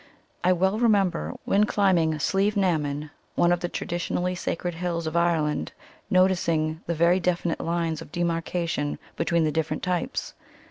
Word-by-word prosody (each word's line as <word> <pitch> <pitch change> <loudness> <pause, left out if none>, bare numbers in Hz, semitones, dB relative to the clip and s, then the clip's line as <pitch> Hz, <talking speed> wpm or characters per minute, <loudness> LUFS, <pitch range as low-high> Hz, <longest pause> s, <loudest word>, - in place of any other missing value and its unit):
I 180 - +4
well 190 +4 +2
remember, 195 - +2
when 205 +1 +3
climbing 180 -7 +2
Slieve 195 +7 +1
na 185 -4 +3
mon, 145 +1 -4 0.2
one 175 - +3
of 175 - +2
the 175 0 -3
traditionally 175 +1 -2
sacred 175 0 -3
hills 170 -1 -3
of 160 - -3
Ireland, 160 - +1 0.4
noticing 170 -4 +2
the 170 - -1
very 170 +3 +4
definite 175 -1 0
lines 165 -2 -1
of 155 - -11
demarcation 170 -3 -1 0.2
between 170 0 +1
the 155 - +1
different 160 0 -2
types. 180 -2 -2
170 Hz, 150 wpm, -26 LUFS, 160-180 Hz, 0.4 s, I